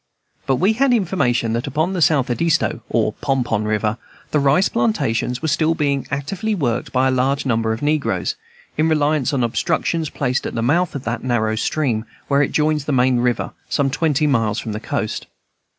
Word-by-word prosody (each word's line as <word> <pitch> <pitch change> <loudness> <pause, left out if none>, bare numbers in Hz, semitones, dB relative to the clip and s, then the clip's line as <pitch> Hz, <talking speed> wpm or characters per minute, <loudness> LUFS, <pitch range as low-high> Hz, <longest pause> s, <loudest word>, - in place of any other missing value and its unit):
But 135 - +3
we 190 +10 +2
had 260 +2 +2
information 135 - 0
that 115 +2 -2
upon 160 +5 0
the 180 - -2
South 140 -5 +3
Edisto, 165 -2 +1
or 110 -2 +1
Pon 135 +1 -1
Pon 110 -3 -1
River, 105 +1 -1 0.3
the 150 - +2
rice 140 +7 +3
plantations 120 +1 0
were - - 0
still 160 +2 +2
being 140 -4 0
actively 180 +10 -2
worked 120 - -1
by 130 0 +2
a - - +2
large 130 +2 0
number 115 -3 +1
of 110 +5 -4
negroes, 150 0 0 0.5
in 160 +1 +3
reliance 150 -3 +1
on 135 -4 0
obstructions 160 +5 0
placed 130 -3 -1
at - - -6
the 115 - -1
mouth 170 +8 +1
of 135 - -4
that 115 0 -3
narrow 110 -3 0
stream, 115 -1 -1 0.2
where 140 0 +3
it 145 - +1
joins 150 -1 +1
the 150 - -2
main 130 -1 +3
river, 120 0 0 0.2
some 140 -2 +1
twenty 150 0 +1
miles 115 -7 +1
from 110 - -4
the 105 - -4
coast. 110 -1 -3
135 Hz, 195 wpm, -20 LUFS, 120-155 Hz, 0.5 s, But